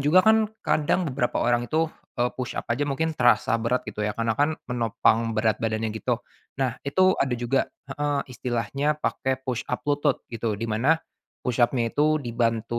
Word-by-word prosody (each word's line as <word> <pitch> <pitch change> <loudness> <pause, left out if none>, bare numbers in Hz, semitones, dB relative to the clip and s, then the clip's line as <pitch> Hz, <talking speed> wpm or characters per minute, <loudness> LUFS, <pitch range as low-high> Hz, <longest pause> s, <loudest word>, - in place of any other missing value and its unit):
juga 155 +7 +5
kan 220 -1 +5 0.2
kadang 155 +4 +2
beberapa 125 -2 0
orang 120 0 +1
itu, 160 0 +1 0.2
eee, 120 0 +1
push-up 130 0 -4
aja 145 +5 -1
mungkin 160 +4 0
terasa 120 -3 +3
berat 125 +2 0
gitu - - -6
ya 105 0 -1
karena 115 0 +1
kan 145 +7 +1
menopang 115 -1 +1
berat 110 -1 +1
badannya 110 0 -1
gitu, 120 +2 -2 0.3
nah 130 -2 -1
itu 185 +7 +3
ada 130 -2 +2
juga 120 +3 +1 0.2
heeh, 145 +1 -1
istilahnya 125 +5 -1
pakai 130 -3 -2
push-up 125 +1 -3
lutut 145 -1 +1
gitu, 115 -2 -2
di 115 - -4
mana 115 +8 +2 0.5
push-up-nya 120 -1 +1
itu 155 +1 +2
dibantu 115 -1 -1
125 Hz, 165 wpm, -25 LUFS, 115-145 Hz, 0.5 s, juga